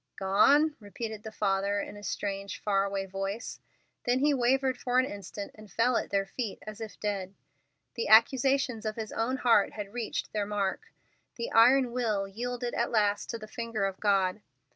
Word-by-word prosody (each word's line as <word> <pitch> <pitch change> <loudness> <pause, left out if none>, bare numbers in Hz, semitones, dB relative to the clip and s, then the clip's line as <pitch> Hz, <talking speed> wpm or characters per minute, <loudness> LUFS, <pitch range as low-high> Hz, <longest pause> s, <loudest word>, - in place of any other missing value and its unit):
"Gone?" 280 +11 +4
repeated 220 +1 -6
the 220 - -8
father 200 -1 0
in - - -5
a 205 - -10
strange, 200 -1 -4
far 195 -1 +1
away 195 -1 -2
voice; 195 +4 -5 0.5
then 245 +1 +2
he 290 +2 +3
wavered 260 +1 +2
for 250 0 -1
an 255 - +5
instant, 200 -2 -7
and 215 -2 -14
fell 235 +4 +2
at - - -1
their 195 -1 +1
feet, 215 +1 -4
as 215 0 -8
if 220 -2 -7
dead. 200 -2 -3 0.6
The 230 - -3
accusations 250 +2 +4
of 215 -1 -3
his 220 -2 -5
own 250 +4 -1
heart 230 -5 +3
had 205 -1 -7
reached 240 -2 -3
their 210 -1 -1
mark. 205 - -2 0.4
The 235 - -4
iron 250 +2 +5
will 220 -5 0
yielded 245 +4 -4
at 235 - 0
last 205 -2 +1
to 230 - -3
the 215 -1 -10
finger 230 -3 -3
of 195 -1 -3
God. 195 -1 +2
215 Hz, 185 wpm, -29 LUFS, 200-245 Hz, 0.6 s, an